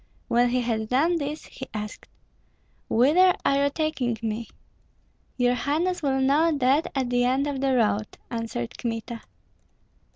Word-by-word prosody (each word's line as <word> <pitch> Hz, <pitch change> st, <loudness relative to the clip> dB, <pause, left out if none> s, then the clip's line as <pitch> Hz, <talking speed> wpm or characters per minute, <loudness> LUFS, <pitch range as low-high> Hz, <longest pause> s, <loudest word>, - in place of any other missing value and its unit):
When 240 Hz, +1 st, +3 dB
he 250 Hz, +1 st, +1 dB
had 220 Hz, -2 st, -2 dB
done 320 Hz, +7 st, +2 dB
this 300 Hz, 0 st, -4 dB
he 265 Hz, -, -9 dB
asked, 210 Hz, 0 st, -6 dB, 0.8 s
"Whither 325 Hz, +10 st, +5 dB
are 280 Hz, 0 st, +3 dB
you -, -, +2 dB
taking 280 Hz, -6 st, -1 dB
me?" 225 Hz, +1 st, -3 dB, 0.9 s
"Your 245 Hz, -1 st, +3 dB
highness 320 Hz, +8 st, -1 dB
will 270 Hz, -3 st, +1 dB
know 295 Hz, +5 st, +3 dB
that 275 Hz, +4 st, +2 dB
at 260 Hz, -3 st, -1 dB
the 245 Hz, 0 st, +2 dB
end 260 Hz, +3 st, +2 dB
of 280 Hz, -2 st, -3 dB
the 270 Hz, -1 st, +2 dB
road," 215 Hz, -3 st, 0 dB
answered 230 Hz, -, -4 dB
Kmita. 230 Hz, 0 st, -4 dB
255 Hz, 150 wpm, -25 LUFS, 235-285 Hz, 0.9 s, Whither